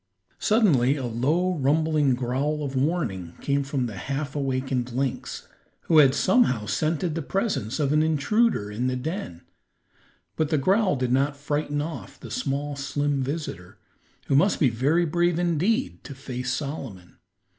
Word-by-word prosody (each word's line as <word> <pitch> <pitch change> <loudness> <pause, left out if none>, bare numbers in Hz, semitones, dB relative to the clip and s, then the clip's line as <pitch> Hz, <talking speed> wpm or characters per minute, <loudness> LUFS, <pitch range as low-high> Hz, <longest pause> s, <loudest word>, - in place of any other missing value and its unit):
Suddenly 155 - +3
a 135 -3 -4
low, 150 +11 +1
rumbling 150 -1 +2
growl 135 +5 -1
of 135 -1 -4
warning 130 - -1
came 140 0 0
from 135 -2 -2
the 110 -5 -6
half 140 +6 -4
awakened 130 -2 -1
lynx, 130 0 -3 0.3
who 160 -2 +4
had 140 -2 +6
somehow 185 - +3
scented 160 - -1
the 165 - -2
presence 150 - -2
of 145 -1 +1
an 150 - +4
intruder 160 - +1
in 120 +5 -1
the 130 - 0
den, 130 - -5 0.9
but 155 -2 0
the 155 - +2
growl 190 +5 +2
did 125 -2 -1
not 140 +2 +1
frighten 145 0 -2
off 160 +1 -7
the - - -10
small, 145 +1 -2
slim 140 0 -1
visitor, 130 - -5 0.5
who 135 - +1
must 190 +9 +3
be 135 - +4
very 140 +9 +2
brave 175 +1 +1
indeed 180 - 0
to 140 - -9
face 125 -1 -4
Solomon. 130 - -5
140 Hz, 155 wpm, -25 LUFS, 130-160 Hz, 0.9 s, had